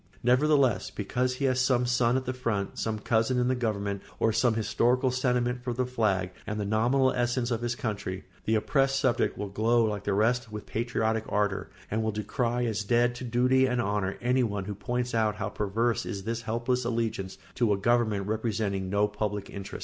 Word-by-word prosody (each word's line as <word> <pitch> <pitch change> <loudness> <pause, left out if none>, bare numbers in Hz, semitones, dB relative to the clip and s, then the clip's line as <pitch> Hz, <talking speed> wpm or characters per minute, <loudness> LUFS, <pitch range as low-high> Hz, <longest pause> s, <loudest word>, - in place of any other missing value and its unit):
Nevertheless, 130 -3 +3
because 125 +5 -1
he 140 - -1
has 130 -1 +2
some 125 -1 +2
son 120 0 +2
at 130 - -3
the 130 - -2
front, 115 -6 -2
some 110 -1 -1
cousin 115 +3 +1
in 125 0 +2
the - - +3
government, 100 -4 -2 0.2
or 115 - +2
some 115 +1 +2
historical 125 +3 +2
sentiment 125 -1 0
for 125 -1 -2
the 125 +2 0
flag 105 -7 0 0.2
and 105 0 -3
the 105 - -1
nominal 120 +6 +2
essence 120 0 0
of 115 -1 -1
his 120 0 -1
country, 100 -6 -4 0.2
the 110 - +2
oppressed 135 +4 +2
subject 125 -3 +1
will 105 - -4
glow 115 +3 +2
like 105 -2 -2
the 100 - 0
rest 115 +2 +1
with 105 -1 -6
patriotic 110 -1 -1
ardour, 105 -1 0 0.2
and 110 +2 0
will 110 0 0
decry 120 +3 -1
as 110 -2 -1
dead 120 +3 +2
to 125 - -8
duty 125 +2 +3
and 125 -1 0
honour 100 -3 -1
anyone 120 -6 +1
who 105 - -4
points 125 +4 -3
out 110 -2 +1
how 105 0 -3
perverse 110 +4 0
is 100 -3 -5
this 115 +2 -3
helpless 120 +3 -1
allegiance 115 -5 -2 0.2
to 120 -4 +1
a 100 - +2
government 110 -2 +1
representing 105 -3 -1
no 100 +2 +2
public 105 -1 -3
interest. 100 -1 -7
115 Hz, 195 wpm, -28 LUFS, 105-125 Hz, 0.2 s, Nevertheless